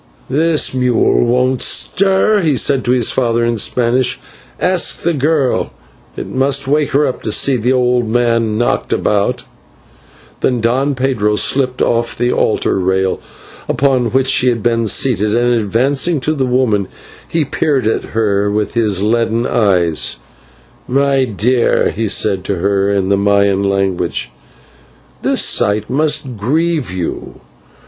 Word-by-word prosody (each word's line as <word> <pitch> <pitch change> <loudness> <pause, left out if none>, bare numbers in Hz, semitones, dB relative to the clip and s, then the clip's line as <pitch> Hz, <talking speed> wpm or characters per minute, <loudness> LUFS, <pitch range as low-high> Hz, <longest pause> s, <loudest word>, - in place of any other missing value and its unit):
"This 155 +1 +1
mule 125 -1 +1
won't 125 +1 +1
stir," 200 +2 +2
he 155 -6 +1
said 135 -1 +1
to 120 - +1
his 125 -3 +2
father 120 -2 0
in 115 -1 -1
Spanish; 125 +3 0 0.4
"ask 180 -1 +1
the 170 - +1
girl, 145 -2 0 0.4
it - - -5
must 135 +1 -1
wake 150 +1 +1
her 145 +2 +3
up 125 - -4
to 110 - -4
see 135 +5 +2
the 125 +2 0
old 125 -2 +1
man 115 -2 0
knocked 120 - -1
about." 100 -1 0 1.0
Then 125 -2 0
Don 130 +5 0
Pedro 125 -5 0
slipped 130 +3 0
off 115 0 -1
the 120 +1 0
altar - - 0
rail 95 0 0 0.5
upon 130 -3 +1
which 130 +2 +1
he 130 - +1
had 120 -3 0
been 115 -1 0
seated, 105 -1 +1
and, 120 +1 +2
advancing 130 - 0
to 155 - 0
the 135 -4 -1
woman, 120 -6 0 0.4
he 165 -2 -1
peered 140 -2 -1
at 110 - 0
her 105 -2 +1
with 105 0 -2
his 105 -5 +1
leaden 115 +1 0
eyes: 90 - +1 0.7
"My 135 0 +1
dear," 120 +2 +1
he 110 +1 -3
said 100 -2 0
to 100 - -2
her 100 +2 0
in 100 -2 0
the 100 - +2
Maya 100 0 +2
language, 95 -9 -2 0.9
"this - - +1
sight 105 +2 +1
must 145 -2 0
grieve 155 +6 -1
you. 90 -2 -6
120 Hz, 145 wpm, -15 LUFS, 105-135 Hz, 1.0 s, her